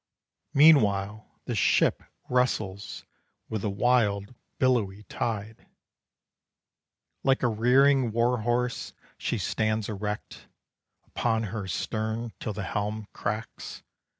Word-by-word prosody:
Meanwhile 110 -9 +5 0.2
the - - -2
ship - - +3 0.3
wrestles 110 -6 -1 0.4
With 110 -2 -2
the 105 - -1
wild 100 -1 +1 0.2
billowy 105 -6 +1
tide. 110 0 -4 1.6
Like 135 0 +2
a - - +5
rearing 125 +3 +4
war 120 +2 +2
horse 120 +1 -1 0.3
she - - -1
stands 110 -1 0
erect, 105 0 -5 0.6
Upon 115 -2 0
her 105 -4 -4
stern, 110 +4 -3
till 105 - -3
the 105 0 -4
helm 105 +2 -3
cracks. 110 +2 -5
110 Hz, 100 wpm, -27 LUFS, 105-125 Hz, 1.6 s, Meanwhile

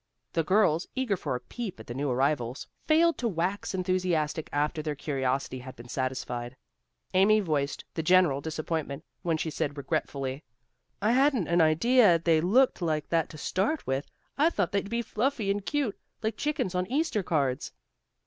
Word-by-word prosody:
The 165 - +1
girls, 180 -2 +3
eager 260 -6 +1
for 145 - -3
a - - -3
peep 195 - -6
at 110 - -10
the 120 - -6
new 140 +3 -2
arrivals, 130 -1 0 0.2
failed 330 +2 +4
to 240 - 0
wax 190 +1 -2
enthusiastic 180 -4 0
after 150 +2 0
their 150 -1 -3
curiosity 135 -2 -2
had 130 +1 -9
been 120 +1 -12
satisfied. 130 -1 -3 0.6
Amy 200 +3 +5
voiced 145 -7 -1
the 160 - -2
general 165 -4 +4
disappointment 155 -1 -3 0.2
when 165 -2 0
she 160 0 -2
said 145 0 -2
regretfully, 140 -1 -3 0.6
"I 215 - +4
hadn't 260 - +3
an 170 0 +3
idea 175 +5 +5
they 165 -1 +2
looked 235 +7 +3
like 155 -3 -1
that 165 -1 +1
to - - -10
start 195 - -1
with. 135 +2 -2 0.3
I 310 +3 +5
thought 200 - -1
they'd 200 0 -1
be 235 +1 -1
fluffy 220 -2 0
and 200 0 -2
cute, 275 -4 -1 0.2
like 220 0 0
the - - -10
chickens 290 -11 -1
on 180 0 0
Easter 280 -4 0
cards." 140 -8 -1
165 Hz, 175 wpm, -28 LUFS, 140-210 Hz, 0.6 s, Amy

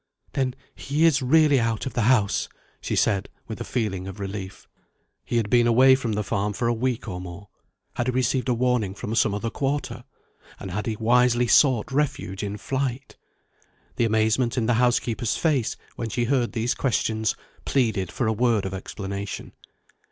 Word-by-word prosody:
"Then 130 -2 -1 0.2
he 150 +4 0
is 155 -4 +4
really 145 +1 +4
out 115 -2 -1
of 130 - -4
the 120 - 0
house?" 105 -6 +2 0.3
she - - -2
said 100 -3 +1 0.2
with 110 +1 -6
a - - -1
feeling 105 -7 -2
of 95 +1 -8
relief. 95 -1 -6 0.6
He 120 - -1
had 115 -3 +1
been 120 +2 +4
away 130 +3 +6
from 125 -4 0
the 105 +1 -1
farm 100 +1 -1
for 120 +2 -1
a 120 - +2
week 125 +1 -2
or 90 -4 -5
more. 90 +2 -9 0.4
Had 120 - -2
he - - +2
received 130 +1 0
a - - +3
warning 120 -5 0
from 105 - -5
some 110 -2 +2
other 115 +2 -3
quarter? 140 +5 -2 0.6
and 95 - -7
had 105 +5 -3
he 110 - -1
wisely 120 +2 +3
sought 125 0 +4
refuge 135 -9 -1
in 105 0 -4
flight? 130 +4 -3 0.8
The 120 - +2
amazement 110 +3 +1
in 120 - +1
the 120 - +2
housekeeper's 120 -2 +1
face, 145 -8 0 0.2
when 115 - -3
she 120 +3 -1
heard 125 -1 +1
these 115 +1 0
questions, 110 -4 0 0.3
pleaded 110 -9 0
for 125 - -2
a 110 - +2
word 115 -3 +1
of 95 - -4
explanation. 100 +1 -6
115 Hz, 180 wpm, -24 LUFS, 105-125 Hz, 0.8 s, away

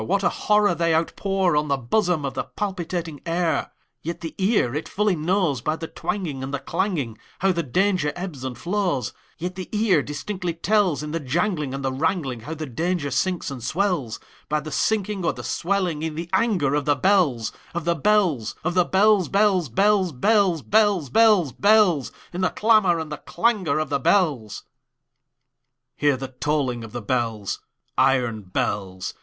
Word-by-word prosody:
What 195 - 0
a - - +4
horror 210 -3 +2
they 165 0 +1
outpourOn 170 -1 +1
the 140 -1 +1
bosom 160 - 0
of 135 - -3
the - - -3
palpitating 175 -6 -4
air! 170 -1 0 0.3
Yet 170 +2 -5
the 165 - -5
ear 190 - +2
it 150 +2 -4
fully 210 -2 +1
knows, 165 - 0
By 155 +5 0
the 165 0 -6
twangingAnd 140 -11 -4
the 140 - -1
clanging, 150 - -2 0.2
How 190 +1 +2
the 170 -2 0
danger 180 +1 +1
ebbs 175 -7 -6
and 130 -2 -5
flows; 175 - -1 0.2
Yet 180 +2 -4
the 185 -1 -7
ear 210 -7 +3
distinctly 175 +4 -4
tells, 185 -4 +1
In 150 - -5
the 165 - -1
janglingAnd 150 -2 -1
the 135 -1 -1
wrangling, 140 -4 -1
How 155 +8 -6
the 155 0 -5
danger 160 +2 -2
sinks 175 +4 -1
and 130 -4 -7
swells,—By 155 - -2
the 155 +1 -8
sinking 205 +3 0
or 170 - +1
the - - -8
swelling 180 -4 -1
in 160 -1 -3
the 165 +2 -6
anger 185 - +2
of 145 -1 0
the 145 -1 +3
bells, 145 - +2 0.2
Of 175 -2 -3
the 170 - +3
bells, 170 - +1
Of 175 +2 0
the 180 -1 +3
bells, 200 0 +3
bells, 195 -6 +2
bells, 195 - +2
bells, 185 - +2
Bells, 195 - +2
bells, 210 - +5
bells—In 185 - +2
the 185 - +3
clamor 215 -6 +3
and 160 -1 -5
the 150 - -4
clangor 215 -5 0
of 155 - -1
the 140 - 0
bells! 135 - +1 1.3
Hear 145 -1 +2
the 135 0 -6
tolling 130 -3 -1
of 110 - -9
the 120 -1 -6
bells, 115 -3 -1 0.4
Iron 125 -4 +2
bells! 95 0 -3
165 Hz, 170 wpm, -23 LUFS, 140-190 Hz, 1.3 s, bells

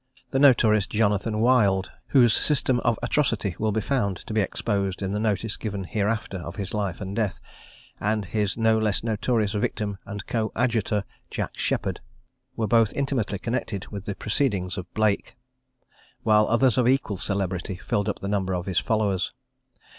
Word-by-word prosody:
The 135 - +1
notorious 115 -7 +5
Jonathan 105 0 +1
Wild, 105 -6 +3 0.2
whose 120 -5 +5
system 135 -4 +3
of 120 -2 +1
atrocity 115 - 0
will 110 0 +1
be 110 +1 0
found 100 -6 0
to - - -5
be 110 - +3
exposed 100 -1 -1
in 95 - -2
the 105 - -1
notice 110 0 -1
given 100 -3 -4
hereafter 105 +1 -1
of 85 -1 -7
his 100 -2 -4
life 100 -3 -2
and 95 0 -5
death, 105 -6 -1 0.6
and 105 0 0
his 105 +2 -1
no 110 -1 +3
less 110 -2 +1
notorious 110 -1 0
victim 105 -1 -2
and 100 0 -6
coadjutor, 110 -2 0 0.3
Jack - - -4
Sheppard, - - -1 0.6
were 110 - 0
both 115 -1 +3
intimately 130 -8 -1
connected 115 -3 -3
with 100 -1 -7
the 100 - -3
proceedings 105 -6 0
of 90 -2 -7
Blake; 110 -2 0 0.9
while 105 -1 +4
others 120 +1 +3
of 120 - +3
equal 125 -6 +1
celebrity 95 -1 -2
filled 100 +2 -1
up - - -4
the 100 - -3
number 95 -2 0
of 90 0 -3
his 95 -4 +1
followers. 105 -4 0
105 Hz, 165 wpm, -25 LUFS, 100-115 Hz, 0.9 s, notorious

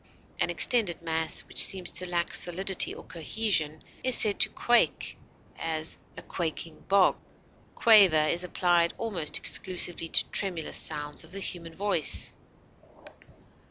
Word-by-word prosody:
An - - 0
extended 210 -10 +2
mass 160 -1 0
which - - +2
seems 185 -2 +1
to 180 +2 -4
lack 170 -1 -2
solidity 190 +2 +2
or - - -10
cohesion 165 -3 -2 0.2
is 255 -1 +4
said 205 -2 +3
to - - +3
quake; 240 0 0 0.4
as, 160 -1 -1 0.2
a - - -10
quaking 165 -1 -6
bog. 195 -1 +2 0.6
Quaver 195 -10 +5
is 170 +3 -2
applied 175 -1 0
almost 190 -9 -2
exclusively 180 -2 -1
to - - +2
tremulous 180 -6 -2
sounds 145 0 -2
of - - -14
the 195 - -5
human 170 -4 -7
voice. 200 -5 +1
175 Hz, 130 wpm, -26 LUFS, 160-195 Hz, 0.6 s, Quaver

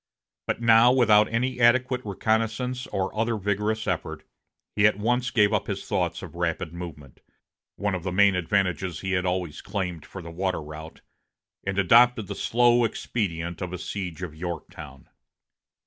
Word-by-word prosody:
But - - -1
now, 115 +1 +6
without 110 -5 +4
any 125 +2 -1
adequate 125 +1 +3
reconnaissance 115 +5 -1
or 95 +1 -3
other 115 +1 0
vigorous 105 +2 -1
effort, - - -3 0.5
he 105 0 +5
at 105 - 0
once 120 +4 0
gave 105 -3 +3
up - - 0
his - - -4
thoughts - - -1
of - - -9
rapid 80 - -2
movement, 80 -6 -9 0.6
one 100 -1 -2
of 90 - -2
the 90 +1 -3
main 100 +2 +4
advantages 90 -1 -1
he 95 - -3
had 90 -1 0
always 90 -4 -2
claimed 90 -5 -4
for 95 - -10
the 85 - -8
water 95 +1 -2
route, 75 +1 -10 0.7
and 100 -1 -1
adopted 115 +4 +5
the - - -5
slow 120 0 +3
expedient 85 -7 -3
of 90 -1 -4
a - - -3
siege 90 -2 -5
of 85 -4 -5
Yorktown. 85 +1 -8
100 Hz, 165 wpm, -25 LUFS, 90-115 Hz, 0.7 s, now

